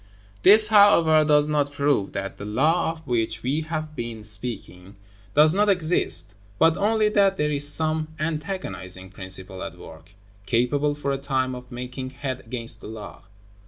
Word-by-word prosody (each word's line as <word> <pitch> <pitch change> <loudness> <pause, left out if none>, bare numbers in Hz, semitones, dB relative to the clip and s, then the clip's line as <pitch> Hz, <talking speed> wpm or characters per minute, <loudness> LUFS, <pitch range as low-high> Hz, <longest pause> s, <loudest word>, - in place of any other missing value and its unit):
This, 210 +2 +7
however, 170 -7 +5
does 150 -1 +3
not 145 -1 0
prove 140 -7 0
that 100 0 -5
the - - -7
law 160 +11 +1
of 160 -1 -17
which 120 -4 -2
we 140 +5 -1
have 155 -1 -5
been 115 -3 -6
speaking 105 -3 -4 0.4
does 155 +1 +6
not 205 +2 +2
exist, 130 - +1 0.2
but 165 +5 +4
only 215 +2 +1
that 200 -2 +2
there 150 0 0
is 145 0 +2
some 155 0 -1
antagonizing 150 - -4
principle 95 0 -6
at - - -7
work, 80 +4 -14 0.3
capable 140 +6 +1
for 140 -1 -3
a 135 - -2
time 130 -2 -1
of 125 0 -10
making 125 +1 -6
head 130 -1 -5
against 115 -1 -4
the - - -9
law. 110 -2 -9
140 Hz, 160 wpm, -24 LUFS, 110-160 Hz, 0.4 s, This